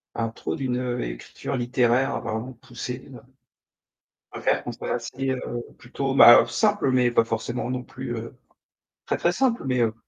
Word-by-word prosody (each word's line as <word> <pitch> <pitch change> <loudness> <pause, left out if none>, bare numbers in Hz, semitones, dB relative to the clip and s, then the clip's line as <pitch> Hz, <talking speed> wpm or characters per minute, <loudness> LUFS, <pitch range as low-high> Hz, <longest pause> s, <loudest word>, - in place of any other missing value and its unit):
à 115 -1 -1
trop 110 - -5
d'une, 130 -4 -2
heu, 125 -1 -2
écriture - - -5
littéraire 125 +2 +1
vraiment 115 +4 -4
poussée 125 +1 -7
là. 125 -3 -11 1.1
Je - - -7
préfère - - +1
quand - - -4
c'est - - -7
assez 125 +3 -3
heu, 120 -2 -4
plutôt, 135 +2 -3
bah, 120 -3 +10
heu, - - 0
simple, 205 - +1
mais 125 -1 +3
pas 115 -1 +3
forcément 115 +2 -3
non 130 -1 -2
plus, 130 -2 -6
heu, 115 +3 -8 0.7
très, - - -1
très 170 - +2
simple, 240 +5 +1
mais 125 -1 +1
heu, 110 -1 +1
125 Hz, 180 wpm, -25 LUFS, 120-130 Hz, 1.1 s, bah